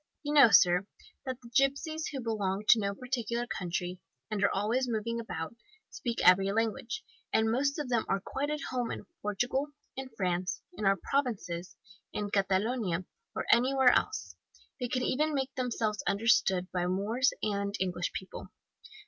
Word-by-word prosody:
You 295 0 -2
know, 285 -5 +8
sir, 180 -2 +5 0.4
that 260 -1 -3
the 235 - -11
gipsies, 285 +4 +1
who 270 -3 -4
belong 205 -4 -1
to 230 - +8
no 200 -1 -1
particular 240 -1 -2
country, 180 -3 -3 0.3
and 205 -2 -1
are 200 - +5
always 235 +6 0
moving 230 +1 -1
about, 165 -4 -5 0.4
speak 240 -4 -3
every 195 +2 +6
language, 225 +1 -1 0.3
and 220 0 +3
most 280 +5 +1
of 295 -3 -3
them 235 -3 +1
are 195 - +2
quite 275 +8 -3
at 300 -1 -2
home 245 -2 -1
in - - -5 0.2
Portugal, 245 +7 0 0.3
in 265 0 -5
France, 180 -1 -1
in 215 - -4
our 195 0 +4
Provinces, 205 -10 -1 0.4
in 205 -1 -3
Catalonia, 195 -1 +1 0.3
or - - -2
anywhere 255 +2 +5
else. 425 +1 0 0.4
They 250 - -1
can 255 +1 -1
even 300 +4 +1
make 270 -1 -1
themselves 230 -5 -1
understood 195 -3 +2
by 180 -1 0
Moors 215 +8 +1
and 200 -1 -1
English 180 -2 -1
people. 190 - -7
225 Hz, 160 wpm, -30 LUFS, 195-255 Hz, 0.4 s, know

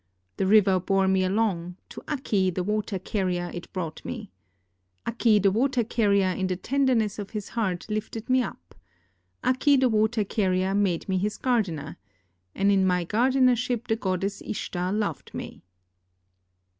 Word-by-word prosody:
The 190 - +1
river 195 -2 +5
bore 195 +1 +1
me 190 0 +3
along; 185 -3 -1
to - - -9
Akki 210 -10 0
the 180 +1 -2
water 210 0 -1
carrier 180 -2 -2
it 175 - -8
brought 165 -5 -5
me. 220 -5 -6 0.7
Akki 230 -2 +3
the 195 0 +3
water 245 +3 +1
carrier 200 -4 +2
in 190 +1 -1
the 185 - -1
tenderness 235 -1 +1
of 205 -1 -5
his 210 -3 -6
heart 190 -7 -2
lifted 215 +1 -4
me 255 0 +3
up. 85 - -7 0.7
Akki 265 +2 +3
the 260 -1 +3
water 220 0 +2
carrier 190 -2 0
made 195 -4 0
me 190 -1 0
his 210 +3 -2
gardener. 185 - -1 0.6
And 200 +1 +3
in 195 -1 +3
my 180 -2 +1
gardenership 250 +2 +2
the 220 - +3
goddess 195 -1 -2
Ishtar 180 -3 -3
loved 205 -7 -3
me." - - -7
205 Hz, 155 wpm, -26 LUFS, 185-225 Hz, 0.7 s, river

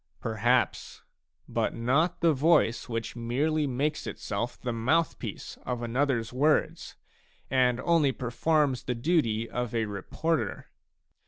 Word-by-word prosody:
Perhaps, 115 +3 0 0.4
but - - -1
not 135 +11 +1
the 165 -2 +4
voice 145 -5 +2
which 115 0 -3
merely 145 +6 0
makes 145 +4 -1
itself 110 +3 -4
the 120 -2 -3
mouth 140 +8 +1
piece - - -7
of 125 -1 -3
anothers 120 -1 0
words, 150 +4 +1 0.6
and 125 -2 +3
only 165 -4 +3
performs 130 +2 0
the 125 - -3
duty 115 -5 +1
of 120 -1 -3
a 115 -1 +1
reporter. 110 - -3
125 Hz, 120 wpm, -28 LUFS, 115-150 Hz, 0.6 s, the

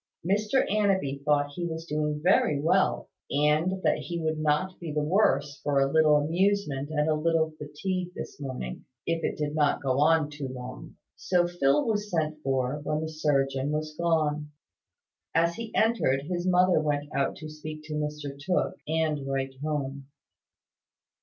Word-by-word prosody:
Mr 210 +7 +2
Annanby 190 -10 +1
thought 145 -1 +2
he 175 - -4
was 160 0 -5
doing 150 -1 -1
very 160 -5 +3
well; 100 - +2 0.2
and 155 +6 +1
that - - +2
he 170 -1 -4
would 160 -1 -1
not 155 +5 0
be 170 -3 -5
the 150 0 0
worse 145 -5 +2
for 145 -1 +1
a 135 0 +2
little 155 -1 +5
amusement 160 -2 0
and 150 -1 0
a 155 - +3
little 160 +1 +1
fatigue 180 +5 -3
this - - -7
morning, 130 - -5 0.2
if 165 0 -1
it - - -1
did 150 -1 -2
not 150 -2 +1
go 130 0 +1
on 155 0 +3
too 150 -2 -5
long. 125 0 -8 0.2
So 175 -1 +2
Phil 150 -4 +2
was 210 -2 -1
sent 155 -4 -1
for, 135 +1 -1
when 150 +1 -1
the 160 - -3
surgeon 135 -3 0
was 155 0 -3
gone. 155 -3 0 0.9
As 170 +1 +3
he 225 +3 -6
entered, 215 - +2
his 175 +3 -3
mother 180 -1 +4
went 145 -1 -1
out 140 0 +1
to 155 - -8
speak 155 0 -8
to 155 0 -7
Mr 150 -2 -3
Tooke, 185 +2 0
and 155 -3 0
write 135 -1 -2
home. 140 -3 -3
150 Hz, 165 wpm, -28 LUFS, 145-170 Hz, 0.9 s, little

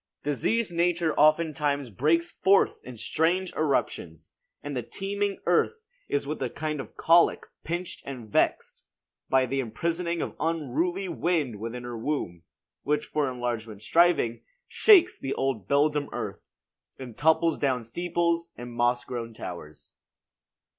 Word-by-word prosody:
"Diseased 175 - 0
Nature 170 -1 +1
oftentimes 150 -4 +2
breaks 160 - +1
forth 195 +1 +3
In 125 -2 -9
strange 175 +10 0
eruptions: 130 - -2 0.3
and 145 -1 -5
the 125 - -1
teeming 200 - -3
earth 450 -1 +1 0.2
Is 140 - -1
with 150 +1 -4
a 130 - -1
kind 155 +3 -4
of 115 - -13
colic 170 +1 +4 0.2
pinched 175 +3 -4
and 125 -5 -7
vexed 105 - 0 0.5
By 130 -1 +4
the 135 +2 -2
imprisoning 170 +8 -2
of - - -6
unruly 165 +4 -1
wind 160 - -1
Within 115 +3 -5
her 120 -1 -6
womb; 110 - -3 0.4
which 150 +1 0
for 150 -3 -1
enlargement 115 -4 -4
striving, 170 -6 +3 0.3
Shakes 370 -5 +5
the 135 - -3
old 130 -8 -2
beldam 145 +1 +2
earth, - - -5 0.6
and 125 -4 -9
topples 160 +1 +3
down 130 -4 0
Steeples 170 +6 -1
and 120 0 -8
moss 120 +1 +1
grown 115 -2 -5
towers." 75 -7 -9
145 Hz, 135 wpm, -27 LUFS, 120-170 Hz, 0.6 s, Shakes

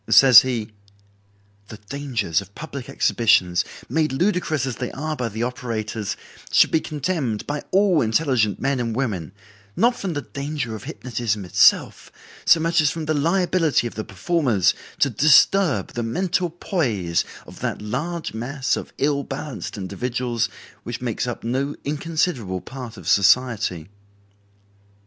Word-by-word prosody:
Says 130 -6 +9
he: 120 -4 -3 1.0
"The 110 - -9
dangers 120 - -1
of 100 +1 -15
public 140 -5 -7
exhibitions, 90 -6 +3 0.2
made 155 -2 +1
ludicrous 160 -3 0
as 130 -3 -4
they 125 - -4
are 155 +3 -3
by 125 -4 -2
the 110 +2 -3
operators, 115 -4 -3 0.3
should - - +5
be 160 - +3
condemned 145 - -2
by 145 0 -3
all 190 -4 +3
intelligent 115 -3 +1
men 135 -1 0
and 115 -2 -2
women, 105 - -2 0.4
not 240 +2 +3
from 195 -7 -4
the 145 - -3
danger 140 -4 -4
of 110 - -8
hypnotism 115 -5 -3
itself 95 +2 +3 0.3
so 165 - +6
much 165 +1 +2
as 150 - +3
from 160 0 -4
the 155 - 0
liability 165 -2 +2
of 120 - -4
the 110 - -4
performers 105 - +1 0.3
to 140 - +4
disturb 150 - +4
the 120 - -2
mental 175 +9 0
poise 120 - -1 0.2
of - - -13
that - - -3
large 160 +11 -4
mass 130 +4 -1
of - - -6
ill 140 0 +1
balanced 135 -4 -6
individuals 115 +4 -2 0.3
which 115 +3 -6
makes 125 0 -2
up 120 - -5
no 135 +5 -1
inconsiderable 145 - -1
part 125 -4 -8
of 90 -4 -10
society." 100 -6 +3
125 Hz, 145 wpm, -22 LUFS, 110-155 Hz, 1.0 s, Says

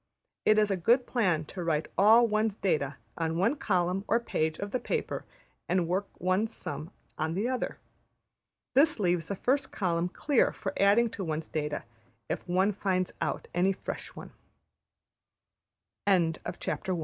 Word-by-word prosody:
It 215 - +5
is 210 -1 +3
a - - +2
good 240 +8 +3
plan 180 -10 +1
to 180 +3 -6
write 160 -2 0
all 220 +4 +7
one's 215 -1 +1
data 150 -9 0 0.2
on 165 0 0
one 215 - +2
column 180 -5 0
or 230 - +3
page 160 -9 -1
of 200 0 -5
the 255 - 0
paper - - -3 0.4
and 180 -2 +2
work 190 +3 0
one's 185 +5 +1
sum 170 -3 -6 0.3
on 160 +1 -1
the 205 +5 0
other. 255 0 -2 1.0
This 295 0 +4
leaves 175 -4 +1
the 200 - -2
first 270 +8 0
column 175 -2 0
clear 275 +6 +2
for - - -5
adding 210 +4 +4
to 200 - -5
one's 155 -2 -3
data 150 -1 -2 0.5
if - - -3
one 190 +4 +2
190 Hz, 135 wpm, -29 LUFS, 170-220 Hz, 1.0 s, all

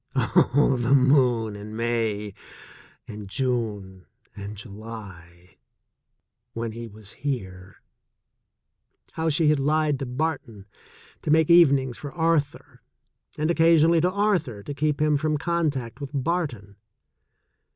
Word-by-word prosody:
Oh, 135 0 +3
the 125 +4 +3
moon 125 -5 +3
in 105 +1 -9
May, 110 -3 -2 0.7
and 105 -2 -9
June 105 -7 -3 0.3
and 100 +1 -8
July, 100 -5 -11 1.0
when 115 -1 -4
he 115 +1 -7
was 105 -1 -11
here! 95 -10 -6 1.3
How 160 0 -1
she 155 0 +2
had 150 -2 +3
lied 150 0 +1
to 135 - -4
Barton 125 -6 -4 0.6
to - - -5
make 160 +1 +4
evenings 140 -7 +4
for 145 - -7
Arthur, 160 -4 -1 0.6
and 155 +2 +1
oc - - -2
casionally 165 0 +5
to 180 +2 +2
Arthur 180 - 0
to 145 - -6
keep 150 +1 -1
him 150 -1 +2
from 155 +1 0
contact 145 -6 -2
with 140 - -5
Barton. 135 - -3
130 Hz, 120 wpm, -25 LUFS, 105-155 Hz, 1.3 s, casionally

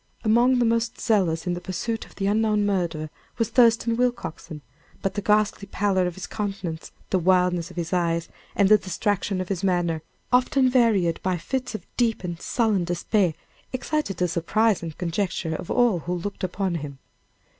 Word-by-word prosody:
Among 240 +3 +4
the 245 - +3
most 230 0 0
zealous 185 -8 +1
in 180 - 0
the 175 - -4
pursuit 190 +6 -3
of - - -19
the 195 - -2
unknown 210 0 +2
murderer 170 -6 -1 0.3
was 230 -2 0
Thurston 230 -1 +4
Willcoxen; 235 -11 -2 0.4
but 195 - 0
the 205 - -2
ghastly 210 -1 +1
pallor 190 -3 +1
of 175 - -5
his 190 - -6
countenance, 195 -6 -4 0.2
the 190 - +3
wildness 180 -1 +2
of 180 - -13
his 170 0 -3
eyes, 170 -2 0 0.3
and 200 - +4
the 210 +1 +6
distraction 195 0 -1
of 185 - -4
his 195 -1 -2
manner, 175 -4 +1 0.3
often 255 +1 +4
varied 215 -9 +3
by 185 -1 0
fits 255 +7 -3
of - - -7
deep 230 -5 +1
and 175 -2 -5
sullen 220 -6 +1
despair, 175 0 +1 0.4
excited 265 -4 -2
the 180 - +1
surprise 200 +6 +1
and 165 -2 -6
conjecture 175 -2 -2
of 165 - -6
all 240 -7 +3
who 175 +2 -3
looked 195 +4 -5
upon 185 0 -1
him. 140 -2 -7
195 Hz, 175 wpm, -24 LUFS, 175-225 Hz, 0.4 s, the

